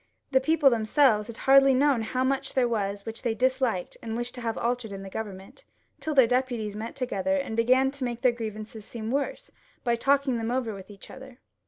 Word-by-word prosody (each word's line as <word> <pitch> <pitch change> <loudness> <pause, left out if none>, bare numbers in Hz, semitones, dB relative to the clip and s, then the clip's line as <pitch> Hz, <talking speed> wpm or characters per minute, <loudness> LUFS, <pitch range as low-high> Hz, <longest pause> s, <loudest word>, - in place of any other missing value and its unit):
The 265 -1 +4
people 305 -1 +4
themselves 220 -1 +3
had 230 -1 -8
hardly 270 0 +5
known 275 -2 +3
how 255 +4 -1
much 270 +1 -1
there 255 -2 +3
was 200 -3 -2
which 225 0 -6
they 230 -3 -1
disliked 255 -6 0
and 225 0 -4
wished 240 +1 -3
to 245 - -8
have 230 -1 -2
altered 240 -2 -2
in 195 0 -7
the 195 - -9
Government, 200 - -7 0.4
till 310 -1 -3
their 265 -3 +7
deputies 240 -4 -1
met 220 +2 -6
together 255 0 -1
and 275 -6 -2
began 255 +4 +3
to 280 -1 -6
make 240 -1 -3
their 250 - +5
grievances 220 -2 -7
seem 225 +1 -6
worse - - -3 0.3
by 235 -2 +2
talking 275 +1 +2
them 225 0 -2
over 245 -3 -1
with 195 0 -10
each 200 -2 -13
other. 265 -1 -12
240 Hz, 210 wpm, -27 LUFS, 220-265 Hz, 0.4 s, their